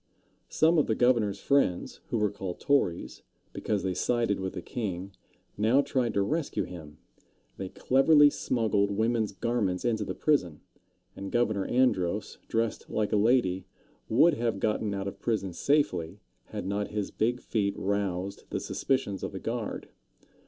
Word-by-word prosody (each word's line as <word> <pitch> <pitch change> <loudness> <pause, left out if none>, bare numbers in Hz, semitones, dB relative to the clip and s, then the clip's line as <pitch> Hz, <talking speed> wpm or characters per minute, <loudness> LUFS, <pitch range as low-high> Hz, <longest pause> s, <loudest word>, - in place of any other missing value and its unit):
Some 160 +1 +4
of 150 - +2
the 110 - +1
governor's 115 -5 +2
friends, 140 -11 +1
who - - 0
were 105 -2 +1
called 95 -3 -6
Tories, 115 -12 0 0.3
because 105 -2 -2
they 95 -1 0
sided 115 +1 0
with 95 -1 -3
the - - -5
king, 100 -5 -4 0.5
now 115 +6 +4
tried 125 -5 -1
to 100 - +3
rescue 155 +8 -1
him. 75 -4 -10 0.6
They 95 -1 -5
cleverly 145 - +5
smuggled 110 -7 +1
women's 110 +1 0
garments 100 -3 -1
into 115 -2 +1
the - - -4
prison, 90 - +1 0.5
and 100 0 -6
Governor 110 -5 +1
Andros, 105 -6 +1
dressed 115 -1 -1
like 105 -1 -1
a - - +2
lady, 100 -4 +2 0.4
would 160 +9 +5
have 115 -6 -1
gotten 105 0 0
out 100 0 -3
of 100 - -6
prison 100 -6 -1
safely 95 - 0 0.3
had - - -6
not 100 +1 -1
his 105 -2 -3
big 120 +3 0
feet 100 -5 -1
roused 100 -1 -2
the - - -2
suspicions 100 -8 -1
of - - -4
the - - -5
guard. - - -4
105 Hz, 155 wpm, -28 LUFS, 95-120 Hz, 0.6 s, cleverly